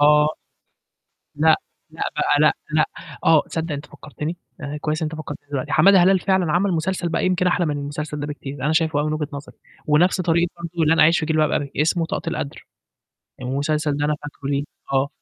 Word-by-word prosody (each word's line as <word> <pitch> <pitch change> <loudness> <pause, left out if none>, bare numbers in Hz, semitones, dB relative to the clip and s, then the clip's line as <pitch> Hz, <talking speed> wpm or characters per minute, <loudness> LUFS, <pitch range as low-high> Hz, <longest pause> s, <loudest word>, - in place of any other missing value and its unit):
آه. 150 +1 +6 1.1
لأ، 155 +1 +5 0.3
لأ - - -10 0.2
بقى 145 - +2
لأ، 150 0 +5 0.2
لأ، 155 - +4 0.4
آه، 160 -2 +6
صدّق 165 0 -3
أنت 145 0 -5
فكّرتني، 150 +5 -7 0.2
آآ 145 +1 -4
كويس 155 0 -1
أنت 160 0 -3
فكّرتني 145 -2 -8
دلوقتي، 135 -3 -3
حمادة 195 -1 +6
هلال 190 +1 +4
فعلًا 185 -3 +1
عمل 185 +4 +2
مسلسل 175 +1 -1
بقى 165 - 0
يمكن 185 0 +2
أحلى 175 0 +2
من 150 -2 -1
المسلسل 150 +1 -5
ده 145 - -3
بكتير، 145 -2 -7
أنا 155 - +2
شايفه 160 -2 +2
أوي 150 - 0
من 155 - -1
وجهة 155 -1 -2
نظري 140 0 -8 0.3
ونَفْس 175 +5 +3
طريقة 170 0 +2
برضه 170 -1 -2
لن 160 +2 +3
أعيش 165 +2 +6
في 160 - -2
جلباب 155 -1 +2
أبي، 140 -1 -1
اسمه 165 +2 +1
طاقة 165 - -3
القدر. 150 -3 -5 0.8
المسلسل 145 +3 -1
ده 145 - -1
أنا 150 0 +1
فاكره 145 -1 -7
ليه، 140 0 0 0.3
آه. 135 +1 +2
155 Hz, 195 wpm, -22 LUFS, 145-165 Hz, 1.1 s, آه